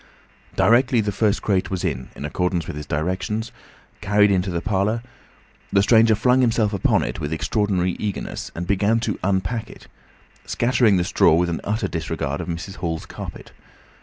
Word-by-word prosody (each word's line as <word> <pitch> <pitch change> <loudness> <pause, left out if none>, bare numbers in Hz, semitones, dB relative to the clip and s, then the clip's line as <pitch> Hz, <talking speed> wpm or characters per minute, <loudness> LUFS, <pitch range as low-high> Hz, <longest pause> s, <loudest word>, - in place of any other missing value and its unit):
Directly 125 +1 +4
the 105 -1 0
first 105 +1 0
crate 95 -3 +1
was, 95 -2 -3
in 65 - -3
accordance 85 +3 -2
with - - -6
his 75 -1 -7
directions, 95 +9 -2 0.5
carried 105 +1 +4
into 95 0 +1
the 85 -2 -1
parlour, 105 +4 0 0.7
the 100 - +4
stranger 110 0 +5
flung 125 +4 +3
himself 110 -3 +2
upon 100 - +2
it - - -4
with 75 -1 -3
extraordinary 95 +2 0
eagerness, 105 -2 -4
and 85 - -4
began 100 +4 +2
to - - -2
unpack 100 +4 -1
it, - - -13 0.6
scattering 120 -4 +2
the 90 - +1
straw 85 -2 +4
with 85 +1 +1
an 85 - -3
utter 105 0 -1
disregard 85 -5 -3
of - - -7
Mrs. 90 +4 -5
Hall's 80 -3 -3
carpet. - - -9
100 Hz, 165 wpm, -22 LUFS, 90-110 Hz, 0.7 s, stranger